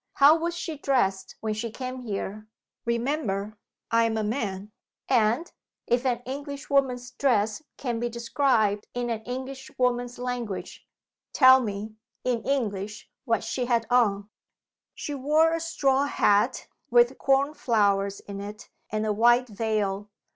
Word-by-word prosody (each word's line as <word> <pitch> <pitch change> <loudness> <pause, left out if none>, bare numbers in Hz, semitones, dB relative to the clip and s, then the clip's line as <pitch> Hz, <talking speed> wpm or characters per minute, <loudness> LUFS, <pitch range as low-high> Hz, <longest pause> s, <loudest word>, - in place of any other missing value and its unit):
How 285 +3 +7
was 340 +1 -2
she 320 -4 -5
dressed 195 -10 0
when 220 -1 -1
she 225 +2 -3
came 255 +3 -6
here? 215 -2 -5 0.4
Remember, 230 -4 -1 0.3
I 230 0 +4
am 225 -1 0
a 220 - 0
man 210 -3 -3 0.4
and 240 +5 +2 0.3
(if 245 +2 +1
an 245 -1 -1
Englishwoman's 275 -2 -1
dress 225 -3 +1 0.2
can 240 -4 -2
be 240 +1 -1
described 230 -3 +1
in 245 -1 -1
an 220 -1 -2
Englishwoman's 250 -1 -2
language) 245 -5 -5 0.5
tell 260 -1 +7
me, 215 -1 -5 0.3
in 245 -2 0
English, 210 -6 -2
what 230 -3 +1
she 245 +3 -2
had 235 -2 +1
on." 210 -4 +2 0.6
"She 295 - -5
wore 305 +4 +3
a 330 - 0
straw 280 -4 +1
hat, 215 -3 +2 0.2
with 240 +2 +4
corn 275 +2 +2
flowers 200 -7 +1
in 200 -1 -8
it, 210 +1 -9 0.2
and 215 0 -1
a 215 - +1
white 240 +3 +4
veil. 210 -2 -1
240 Hz, 140 wpm, -26 LUFS, 215-265 Hz, 0.6 s, How